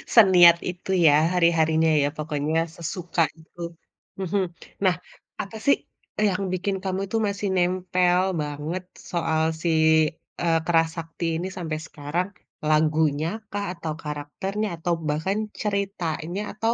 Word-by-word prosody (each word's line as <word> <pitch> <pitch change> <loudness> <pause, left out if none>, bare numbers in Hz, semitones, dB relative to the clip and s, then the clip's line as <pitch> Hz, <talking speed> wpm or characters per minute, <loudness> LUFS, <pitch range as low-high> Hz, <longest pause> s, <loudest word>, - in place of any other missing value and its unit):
Seniat 180 -6 +8
itu 180 +2 -7 0.2
ya, 145 - +7 0.2
hari-harinya 160 -1 +3
ya 145 - +2
pokoknya 155 +2 0
sesuka 170 0 -1 0.2
itu, 175 +2 -14 0.6
mhm. 190 +1 0 0.4
Nah, 185 -3 +4 0.5
apa 210 +2 -7
sih 280 - +5 0.4
yang 200 -2 +2
bikin 195 +2 -1
kamu 190 0 -1
itu 225 - -1
masih 200 0 -2
nempel 180 0 +2 0.2
banget 150 +5 -4 0.3
soal 160 -2 +1 0.2
si, 170 - 0 0.7
eee, 165 -1 +3
Kera 165 -1 +4
Sakti 165 +1 -5
ini 180 - -3
sampai 160 -3 -3
sekarang? 155 +6 -2 0.4
Lagunya 155 0 +2 0.2
kah, 205 0 -1
atau 160 -3 -4
karakternya, 170 +8 -3
atau 175 0 +1 0.2
bahkan 170 +7 0 0.2
ceritanya, 195 -4 -2 0.2
atau 225 +1 +2
175 Hz, 125 wpm, -25 LUFS, 160-190 Hz, 0.7 s, Seniat